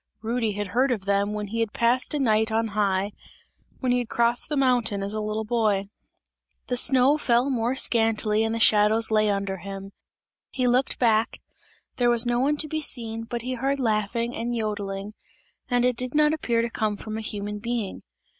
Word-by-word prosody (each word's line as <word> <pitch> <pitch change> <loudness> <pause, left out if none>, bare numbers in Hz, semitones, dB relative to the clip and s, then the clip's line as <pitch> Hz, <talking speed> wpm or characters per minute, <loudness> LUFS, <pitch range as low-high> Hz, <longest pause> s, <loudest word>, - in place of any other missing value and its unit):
Rudy 225 -1 -1
had 205 -1 -4
heard 255 +6 +2
of 210 -6 -2
them, 200 +1 +1
when 210 -1 -4
he 230 +2 -3
had 225 -2 -1
passed 245 +5 +1
a - - 0
night 220 -3 +2
on 225 0 0
high; 200 -1 0 0.7
when 255 -2 +1
he 250 - +2
had 245 - -4
crossed 235 +3 0
the 300 - -1
mountain, 245 -7 +2
as 200 +1 -3
a 215 - -2
little 215 +1 -2
boy. 210 -4 0 0.8
The 250 - 0
snow 265 +3 +4
fell 245 +1 +2
more 240 0 0
scantily 225 -3 +2
and 225 0 -1
the - - -2
shadows 220 +1 +4
lay 215 -1 +3
under 200 -1 -2
him; 195 +1 -8 0.6
he 255 - -2
looked 250 +2 +2
back, 225 -2 +1 0.6
there 245 -1 +3
was 235 0 +3
no 240 0 +1
one 290 +3 +1
to 305 - 0
be 310 +1 -3
seen, 225 -5 -1
but 235 0 -5
he 255 +1 -3
heard 270 +3 -1
laughing 230 0 -1
and 240 +1 -3
jodling 205 -1 -4 0.6
and 245 -1 +2
it 250 -1 +1
did 250 +2 -3
not 300 0 +4
appear 235 -7 0
to 235 - -3
come 215 -2 -1
from 215 +1 -6
a 220 - -4
human 210 -1 -5
being. 230 -3 -3
225 Hz, 200 wpm, -25 LUFS, 210-245 Hz, 0.8 s, snow